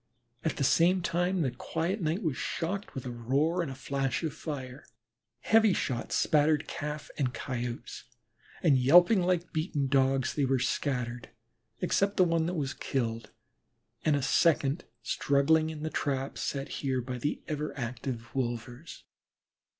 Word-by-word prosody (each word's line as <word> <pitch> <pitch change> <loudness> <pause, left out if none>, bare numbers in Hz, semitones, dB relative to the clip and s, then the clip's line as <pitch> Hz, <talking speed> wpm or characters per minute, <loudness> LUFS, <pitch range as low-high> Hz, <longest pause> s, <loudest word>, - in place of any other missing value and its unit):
At 160 - -1
the - - 0
same 175 +6 +4
time 175 +1 +1
the 130 - 0
quiet 165 - -2
night 165 +6 -1
was 155 -6 0
shocked 190 +9 -3
with 130 - -5
a 125 - -4
roar 140 +9 +1
and 165 - -3
a 135 - -6
flash 135 +2 -2
of 155 -3 -2
fire. 135 -3 -6 0.6
Heavy 220 +1 +5
shots 120 -8 -2
spattered 150 0 +3
Calf 150 0 -5
and 125 -4 0
Coyotes, 120 -1 -5 0.6
and 145 -6 +5
yelping 175 - +6
like 180 -1 0
beaten 155 -3 -1
Dogs 135 -1 +2
they 140 -3 +1
scattered, 125 -2 -2 0.5
excepting 195 0 +3
one 165 -1 +2
that 180 - -2
was 140 -4 -2
killed 115 -4 -2 0.7
and 155 - +3
a 140 - -1
second 150 +2 +2 0.2
struggling 145 +6 +2
in 155 -1 -6
the 160 - -2
trap 135 -1 -2
set 140 -1 -3
here 130 -2 0
by 125 0 -5
the 145 +5 -2
ever 150 0 -2
active 120 -1 -5
wolvers. 120 -2 -4
145 Hz, 150 wpm, -30 LUFS, 130-165 Hz, 0.7 s, yelping